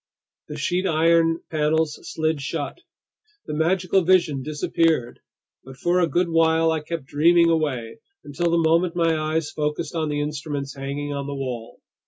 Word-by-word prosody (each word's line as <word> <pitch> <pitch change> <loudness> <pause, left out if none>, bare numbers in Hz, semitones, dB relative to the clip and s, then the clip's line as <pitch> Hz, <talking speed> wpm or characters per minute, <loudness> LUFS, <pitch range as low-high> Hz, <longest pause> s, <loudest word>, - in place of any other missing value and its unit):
The 150 - -7
sheet 180 +5 0
iron 165 0 +3
panels 155 0 0
slid 160 -2 -2
shut. 135 - -4 0.7
The - - -5
magical 180 +4 +2
vision 170 -6 +2
disappeared. 150 -2 0 0.4
But 130 0 -12
for 175 +5 +1
a 175 - +3
good 175 +5 +1
while 165 0 +3
I 160 - 0
kept 155 -1 -6
dreaming 165 +4 +4
away, 130 -8 -2 0.2
until 170 +4 -2
the 170 - +2
moment 165 +2 +2
my 165 -2 +2
eyes 155 0 -1
focused 150 +2 -3
on 160 -2 -1
the 145 0 -1
instruments 145 -2 -4
hanging 140 +1 -4
on 140 0 -4
the 140 - -4
wall. 125 -4 -6
155 Hz, 160 wpm, -23 LUFS, 145-165 Hz, 0.7 s, dreaming